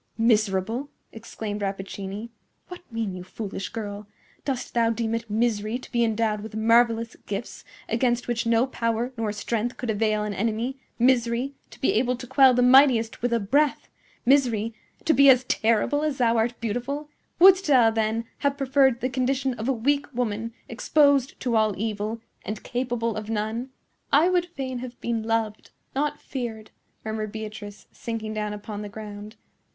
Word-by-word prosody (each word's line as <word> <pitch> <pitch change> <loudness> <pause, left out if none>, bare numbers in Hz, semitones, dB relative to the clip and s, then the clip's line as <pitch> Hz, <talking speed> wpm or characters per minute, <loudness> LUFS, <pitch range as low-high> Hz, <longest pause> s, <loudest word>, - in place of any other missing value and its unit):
"Miserable!" 220 +3 +1 0.2
exclaimed 220 -2 -6
Rappaccini. 195 +2 -5 0.4
"What 360 - -8
mean 225 -4 -2
you, 180 -1 -7
foolish 195 0 -6
girl? 210 -2 -6 0.4
Dost 265 -3 -3
thou 230 -1 +3
deem 230 0 -1
it 230 0 -3
misery 215 0 0
to 255 - -13
be 235 -1 +2
endowed 220 -2 0
with 215 0 -8
marvellous 230 +1 +3
gifts 200 +3 -5 0.2
against 240 +1 0
which 240 -1 -1
no 230 +1 +4
power 235 -1 -2
nor 225 -3 -1
strength 230 +3 -2
could 245 -3 -2
avail 215 0 +1
an 210 -1 -3
enemy—misery, 240 +3 0 0.2
to - - -15
be - - +2
able 250 +3 +2
to 250 +1 -8
quell 265 0 +5
the 250 - +3
mightiest 250 -3 +5
with 245 0 0
a 235 - +2
breath—misery, 245 -1 +1 0.3
to 320 - +4
be 280 +2 +7
as 255 -1 +6
terrible 230 +4 +1
as 300 -3 -1
thou 235 -2 +3
art 230 +1 0
beautiful? 245 +7 -3 0.3
Wouldst 380 +1 +7
thou, 250 -6 +5
then, 220 +1 0
have 280 0 0
preferred 270 -2 +3
the 255 - +1
condition 260 +1 0
of 235 +1 -4
a - - +4
weak 280 +4 0
woman, 230 -2 -2 0.2
exposed 280 +2 +2
to 245 -2 0
all 215 -2 +3
evil 215 +1 -3 0.2
and 210 +1 -5
capable 240 -2 -2
of 215 0 -5
none?" 225 +3 -2 0.4
"I 310 +6 +5
would 355 -1 +2
fain 265 -7 -5
have 245 -1 -8
been 235 -1 -1
loved, 220 -1 -2 0.2
not 290 +2 -1
feared," 230 -5 -6 0.3
murmured 220 -1 -3
Beatrice, 215 -1 -8
sinking 225 -2 -5
down 210 -1 -2
upon 210 0 -6
the 205 - -6
ground. 210 0 -9
230 Hz, 165 wpm, -25 LUFS, 215-255 Hz, 0.4 s, be